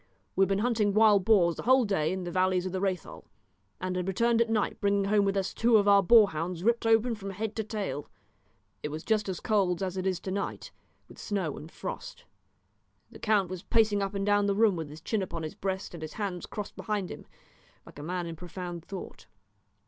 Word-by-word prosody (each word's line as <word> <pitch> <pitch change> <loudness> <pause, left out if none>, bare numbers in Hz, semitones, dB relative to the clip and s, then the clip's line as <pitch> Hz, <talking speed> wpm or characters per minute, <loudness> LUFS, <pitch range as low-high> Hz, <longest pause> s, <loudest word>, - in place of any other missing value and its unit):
We - - +1
had 195 - +4
been 195 - +2
hunting 215 -4 +1
wild 210 -3 +5
boars 175 -7 +4
the - - -4
whole 260 +1 +4
day 160 -7 0
in 190 0 -3
the 175 - -5
valleys 185 0 +1
of 185 - -3
the 190 - -2
Rhéthal, 185 -4 -3 0.6
and 185 0 -3
had 180 0 -2
returned 230 +4 +2
at 235 - +1
night 215 -2 0
bringing 200 -1 +2
home 205 0 +3
with 195 0 0
us 195 -1 -1
two 230 -1 +4
of 205 -1 +2
our 200 0 +7
boar 215 +1 +6
hounds 165 +2 -4
ripped 235 +1 +2
open 225 +2 +4
from 200 -3 -6
head 210 +2 -4
to 220 - 0
tail. 205 -9 -4 0.7
It 150 - -3
was 155 +2 -6
just 215 -2 0
as 185 - -3
cold 195 -4 +1
as 185 0 -3
it 185 0 -1
is 185 -2 0
to 190 - -5
night, 200 +1 -4 0.4
with - - -15
snow 190 -8 -2
and 155 +3 -10
frost. - - -7 0.9
The - - -12
count 205 -4 +1
was 185 -2 -5
pacing 210 -1 +2
up 195 +1 -2
and 195 0 -1
down 205 0 +3
the 200 - +1
room 215 -2 +4
with 160 -3 -5
his 150 +2 -11
chin 215 +4 -1
upon 170 -3 -4
his 155 - -5
breast 190 0 -4
and 170 - -8
his 155 -1 -6
hands 195 -4 -4
crossed 210 -1 -6
behind 205 -4 -3
him, - - -9 0.6
like - - -13
a - - -6
man 175 +3 -3
in 165 -1 -6
profound 175 0 -7
thought. 190 +1 -9
195 Hz, 230 wpm, -29 LUFS, 180-210 Hz, 0.9 s, our